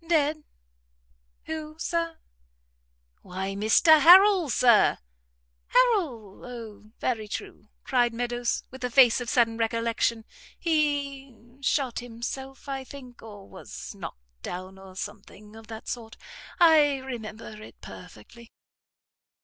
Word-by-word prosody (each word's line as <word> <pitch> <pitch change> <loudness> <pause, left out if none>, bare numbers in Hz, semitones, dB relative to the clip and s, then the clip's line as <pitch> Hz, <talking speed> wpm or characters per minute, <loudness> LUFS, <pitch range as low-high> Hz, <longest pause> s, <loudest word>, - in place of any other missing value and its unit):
"Dead? 310 -2 +1 1.0
who, 310 -1 -6
Sir?" 335 0 -2 1.0
"Why 190 +1 -5
Mr 220 - +5
Harrel, 370 0 +7
Sir." 240 -2 +4 0.7
"Harrel? 335 - +1
O, 225 -4 -9
very 220 -4 -2
true," 205 0 -7 0.2
cried 245 -2 +2
Meadows, 240 +1 -2
with 260 0 -10
a 250 - -1
face 245 -1 +5
of 240 - -4
sudden 230 -2 +2
recollection; 230 0 0 0.3
"he 285 -5 -1 0.2
shot 275 -3 0
himself, 245 +4 -7
I 270 -1 -4
think, 255 -2 -12
or 205 -3 -12
was - - -10
knocked - - -11
down, 185 - -7
or 190 -1 -13
something 210 +1 -9
of 225 -1 -13
that 220 -1 -9
sort. 225 -2 -6 0.4
I 305 -4 +5
remember 225 -4 -8
it - - -13
perfectly." 235 -1 -13
245 Hz, 115 wpm, -26 LUFS, 220-285 Hz, 1.0 s, Harrel